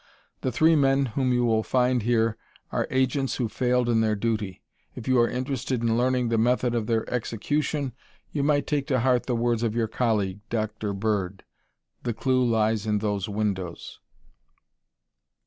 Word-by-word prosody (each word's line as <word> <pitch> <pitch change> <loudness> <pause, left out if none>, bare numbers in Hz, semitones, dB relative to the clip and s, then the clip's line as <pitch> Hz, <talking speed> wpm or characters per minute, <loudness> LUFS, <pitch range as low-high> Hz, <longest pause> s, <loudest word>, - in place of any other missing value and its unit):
The 130 - -1
three 160 +6 +4
men 135 -1 +3
whom 130 0 +1
you 125 0 +2
will 110 -1 +2
find 125 +1 +1
here 115 0 +2 0.4
are - - -1
agents 130 +1 +1
who 120 - -1
failed 125 +2 +1
in 115 -2 +3
their 110 -1 +2
duty. 105 -3 -2 0.3
If 110 - -8
you 130 -1 +4
are 120 - +4
interested 130 -1 -2
in 115 -1 +2
learning 125 0 +1
the 115 -1 +1
method 125 +1 +2
of 115 -3 -1
their 115 -1 0
execution, 135 +4 -2 0.4
you 145 - -1
might 145 0 +2
take 145 -2 -1
to 130 -5 +1
heart 125 -1 +2
the 125 - 0
words 120 -1 +1
of 115 -2 -1
your 115 -1 +1
colleague, 105 -4 0
Dr. 110 -2 -2
Bird: 100 -2 -2 0.6
'The 120 -3 -3
clue 130 0 +2
lies 110 -2 +1
in 105 -1 +2
those 105 -2 -2
windows.'" 100 -5 -3
120 Hz, 170 wpm, -26 LUFS, 110-130 Hz, 0.6 s, three